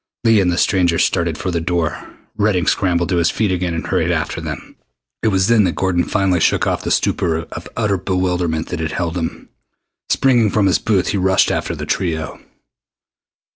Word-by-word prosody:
Leah 115 Hz, -3 st, +4 dB
and 90 Hz, -2 st, +1 dB
the 85 Hz, -, -1 dB
stranger 90 Hz, -4 st, +2 dB
started 85 Hz, -2 st, 0 dB
for 95 Hz, -, -3 dB
the 85 Hz, -1 st, -1 dB
door. 80 Hz, -3 st, -2 dB, 0.3 s
Redding 105 Hz, -4 st, +1 dB
scrambled 85 Hz, -3 st, +1 dB
to 90 Hz, -, +1 dB
his 85 Hz, -1 st, +3 dB
feet 105 Hz, -4 st, 0 dB
again 90 Hz, -2 st, -1 dB
and 80 Hz, -, -4 dB
hurried -, -, 0 dB
after -, -, -2 dB
them. -, -, -7 dB, 0.5 s
It -, -, 0 dB
was 95 Hz, -3 st, +2 dB
then 115 Hz, 0 st, +4 dB
that 85 Hz, -4 st, -1 dB
Gordon 85 Hz, 0 st, 0 dB
finally 95 Hz, -4 st, +1 dB
shook -, -, +2 dB
off -, -, -1 dB
the -, -, -3 dB
stupor 80 Hz, -1 st, 0 dB
of -, -, -7 dB
utter 105 Hz, -4 st, +1 dB
bewilderment 90 Hz, -3 st, -1 dB
that 90 Hz, -, -4 dB
had 80 Hz, -1 st, -3 dB
held 85 Hz, -1 st, -2 dB
him. 80 Hz, -2 st, -5 dB, 0.6 s
Springing 120 Hz, -5 st, +3 dB
from 105 Hz, 0 st, +1 dB
his 95 Hz, -, +3 dB
booth, 100 Hz, -5 st, 0 dB
he 105 Hz, -, 0 dB
rushed 95 Hz, 0 st, +3 dB
after -, -, -2 dB
the -, -, -6 dB
trio. 80 Hz, -4 st, -3 dB
90 Hz, 195 wpm, -18 LUFS, 85-100 Hz, 0.6 s, Leah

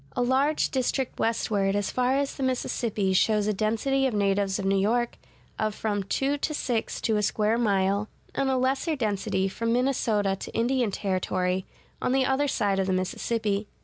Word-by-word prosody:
A 245 Hz, -, +1 dB
large 270 Hz, +5 st, +2 dB
district 260 Hz, 0 st, -1 dB
westward 200 Hz, -3 st, +1 dB
as 205 Hz, -1 st, -1 dB
far 255 Hz, +1 st, +1 dB
as 280 Hz, -1 st, -1 dB
the -, -, -8 dB
Mississippi 230 Hz, -6 st, 0 dB
shows 210 Hz, +2 st, +3 dB
a 215 Hz, -, +1 dB
density 230 Hz, +6 st, +1 dB
of 245 Hz, -, -2 dB
natives 195 Hz, -1 st, +1 dB
of 195 Hz, -, -4 dB
New 195 Hz, 0 st, +2 dB
York 235 Hz, +4 st, +1 dB, 0.4 s
of 215 Hz, -1 st, 0 dB
from 205 Hz, -2 st, -1 dB
two 275 Hz, +9 st, -1 dB
to 305 Hz, +1 st, -1 dB
six 235 Hz, -6 st, -2 dB
to 220 Hz, -2 st, +1 dB
a -, -, +1 dB
square 210 Hz, +2 st, +1 dB
mile, 200 Hz, -1 st, +1 dB, 0.2 s
and 275 Hz, -1 st, 0 dB
a 260 Hz, -, +2 dB
lesser 270 Hz, +5 st, 0 dB
density 200 Hz, -5 st, 0 dB
from 230 Hz, +4 st, -2 dB
Minnesota 230 Hz, -6 st, +1 dB
to -, -, -8 dB
Indian 245 Hz, 0 st, +1 dB
Territory, 185 Hz, -1 st, -1 dB, 0.3 s
on 250 Hz, -, +1 dB
the 265 Hz, -1 st, +3 dB
other 270 Hz, +2 st, +1 dB
side 205 Hz, -7 st, +1 dB
of 190 Hz, -, 0 dB
the 190 Hz, -, +1 dB
Mississippi. 205 Hz, +3 st, -1 dB
220 Hz, 180 wpm, -26 LUFS, 200-260 Hz, 0.4 s, shows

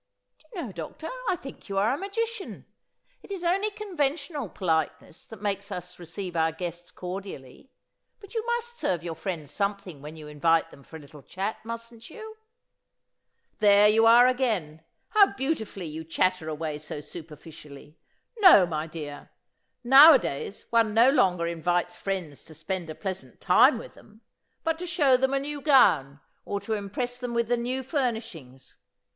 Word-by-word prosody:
"Do 315 Hz, -, -27 dB
you 345 Hz, -, -4 dB
know, 220 Hz, -, -7 dB
doctor, 175 Hz, -, -7 dB, 0.2 s
I 375 Hz, -, +2 dB
think 270 Hz, -9 st, -11 dB
you 195 Hz, -, -3 dB
are 210 Hz, +5 st, +3 dB
a -, -, 0 dB
magician! 445 Hz, +2 st, -4 dB, 0.6 s
It's 390 Hz, -3 st, -7 dB
only 385 Hz, +5 st, +1 dB
conventional 300 Hz, -, -3 dB
politeness 160 Hz, -3 st, -2 dB
that 220 Hz, -2 st, -12 dB
makes 200 Hz, -1 st, -2 dB
us 180 Hz, 0 st, -7 dB
receive 175 Hz, +1 st, -7 dB
our 160 Hz, 0 st, +2 dB
guests 175 Hz, +1 st, -7 dB
cordially. 185 Hz, -, -8 dB, 0.5 s
But 400 Hz, 0 st, -14 dB
you 450 Hz, -2 st, -2 dB
must 475 Hz, 0 st, -3 dB
serve 175 Hz, -2 st, -1 dB
your 170 Hz, -1 st, -4 dB
friends 160 Hz, -3 st, -5 dB
something 200 Hz, -4 st, -3 dB
when 150 Hz, +2 st, -9 dB
you 155 Hz, -1 st, -10 dB
invite 165 Hz, +2 st, +1 dB
them 140 Hz, -, -15 dB
for 160 Hz, -, -14 dB
a -, -, -7 dB
little 150 Hz, 0 st, -14 dB
chat, 195 Hz, +10 st, -5 dB
mustn't 230 Hz, 0 st, -8 dB
you?" 440 Hz, +4 st, -10 dB, 1.2 s
"There 205 Hz, -1 st, +6 dB
you 225 Hz, +2 st, +4 dB
are 240 Hz, +2 st, +8 dB
again! 220 Hz, -, 0 dB, 0.3 s
How 410 Hz, -2 st, +5 dB
beautifully 260 Hz, -, -3 dB
you 160 Hz, 0 st, -6 dB
chatter 165 Hz, 0 st, 0 dB
away 155 Hz, -1 st, -4 dB
so 150 Hz, 0 st, -7 dB
superficially! 150 Hz, -1 st, -12 dB, 0.4 s
No, 365 Hz, -, +8 dB
my 160 Hz, -2 st, -3 dB
dear! 150 Hz, -3 st, -8 dB, 0.5 s
Nowadays 265 Hz, -, +6 dB
one 225 Hz, -2 st, +2 dB
no 240 Hz, +4 st, +6 dB
longer 185 Hz, -, +2 dB
invites 170 Hz, +1 st, -1 dB
friends 180 Hz, -7 st, -5 dB
to 160 Hz, -, -13 dB
spend 170 Hz, +2 st, -4 dB
a 155 Hz, -, -6 dB
pleasant 190 Hz, -2 st, -6 dB
time -, -, +5 dB
with -, -, -10 dB
them, 215 Hz, +1 st, -19 dB, 0.4 s
but 325 Hz, 0 st, -1 dB
to 360 Hz, -, -5 dB
show 295 Hz, -6 st, +3 dB
them 265 Hz, +2 st, +1 dB
a -, -, +2 dB
new 290 Hz, +1 st, -5 dB
gown 165 Hz, -, +4 dB, 0.2 s
or 200 Hz, -, -3 dB
to 220 Hz, +3 st, -3 dB
impress 230 Hz, +5 st, -4 dB
them 245 Hz, -2 st, -4 dB
with 235 Hz, -1 st, +1 dB
the 245 Hz, -, +3 dB
new 250 Hz, +3 st, -3 dB
furnishings. 225 Hz, -, -4 dB
200 Hz, 165 wpm, -26 LUFS, 165-265 Hz, 1.2 s, are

